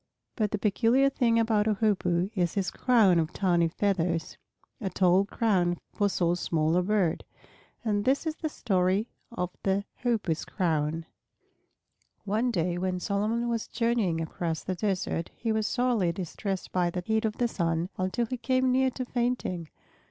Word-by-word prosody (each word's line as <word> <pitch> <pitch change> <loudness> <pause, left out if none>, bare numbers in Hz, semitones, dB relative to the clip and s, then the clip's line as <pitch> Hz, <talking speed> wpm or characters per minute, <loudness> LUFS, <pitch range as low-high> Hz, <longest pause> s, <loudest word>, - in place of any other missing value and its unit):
But 215 -3 0
the 210 - -1
peculiar 230 +6 +3
thing 235 -3 +2
about 220 -2 +2
a 215 - +2
Hoopoe 190 -3 +1
is 175 -5 0
his 195 -2 0
crown 215 -9 +4
of 160 -1 -1
tawny 175 -3 +2
feathers, 170 -3 -1 0.5
a 195 - -1
tall 185 +1 +3
crown 190 -5 +1 0.2
for 205 -1 +1
so 175 -3 +1
small 165 -2 0
a 180 - +4
bird. 185 -3 +1 0.6
And 205 -2 +1
this 270 +7 +1
is 315 -1 -2
the 315 - -3
story 195 -3 0 0.2
of 180 -6 -3
the 195 +1 0 0.2
Hoopoe's 210 -10 0
crown. 160 -3 -1 1.2
One 220 +5 +1
day 175 -4 0
when 185 0 -1
Solomon 215 +5 0
was 230 -1 -2
journeying 230 -8 0
across 165 0 -3
the 185 - -2
desert, 185 -3 -2
he 230 - -2
was 220 -1 +1
sorely 240 -8 +1
distressed 190 +2 -4
by 180 -1 +1
the 180 +1 -4
heat 220 0 +1
of 220 -1 -1
the 240 - +2
sun, 170 -4 -1
until 185 +6 0
he 255 +3 -4
came 255 +1 +1
near 260 +1 +3
to 255 0 -5
fainting. 240 -10 -2
200 Hz, 165 wpm, -28 LUFS, 175-230 Hz, 1.2 s, crown